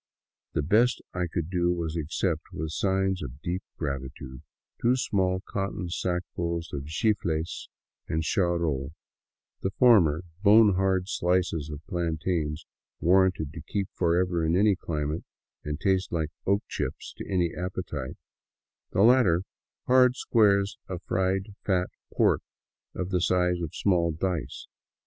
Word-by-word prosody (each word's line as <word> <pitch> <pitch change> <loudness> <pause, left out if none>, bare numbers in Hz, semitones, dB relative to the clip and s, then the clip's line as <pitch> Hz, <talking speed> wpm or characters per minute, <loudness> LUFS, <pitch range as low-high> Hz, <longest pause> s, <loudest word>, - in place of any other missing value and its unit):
The 75 - 0
best 110 +10 +3
I 90 0 -1
could 85 -1 -3
do 90 -1 +2
was 85 -3 -2
to 85 - -2
accept, 80 +1 -2
with 80 0 -4
signs 95 +1 0
of 70 -1 -7
deep 90 +2 -2 0.2
gratitude, 70 -3 -5 0.4
two 120 +2 +4
small 95 -6 0
cotton 95 -3 -3
sackfuls 85 -1 -3
of 70 -1 -4
chifles 80 -2 -1 0.4
and 80 0 -1
charol; 85 - 0 0.7
the 95 - 0
former, 95 -9 +4 0.2
bone 105 0 +7
hard 95 0 +1
slices 90 -5 0
of 75 +1 -8
plan 85 -4 -2
tains 75 -2 -1 0.4
warranted 90 -4 +3
to 80 - -7
keep 100 +5 -3
forever 85 0 +1
in 80 +1 +2
any 100 +1 +4
climate 75 -2 -3 0.4
and 75 0 -4
taste 95 +1 +1
like 80 -3 -1 0.2
oak 100 +1 +2
chips - - -4
to - - -7
any 90 -3 +1
appetite; 90 -7 -5 0.8
the 95 - +4
latter, 110 -8 +5 0.4
hard 125 0 +5
squares 100 -5 +2
of 90 -2 -5
fried 95 +2 -1
fat 90 -2 0 0.2
pork - - +3 0.5
of 90 +1 -3
the 90 -2 +1
size 90 -1 +2
of 80 -3 -5
small 85 -4 +2
dice. 80 -4 -3
90 Hz, 140 wpm, -27 LUFS, 80-95 Hz, 0.8 s, bone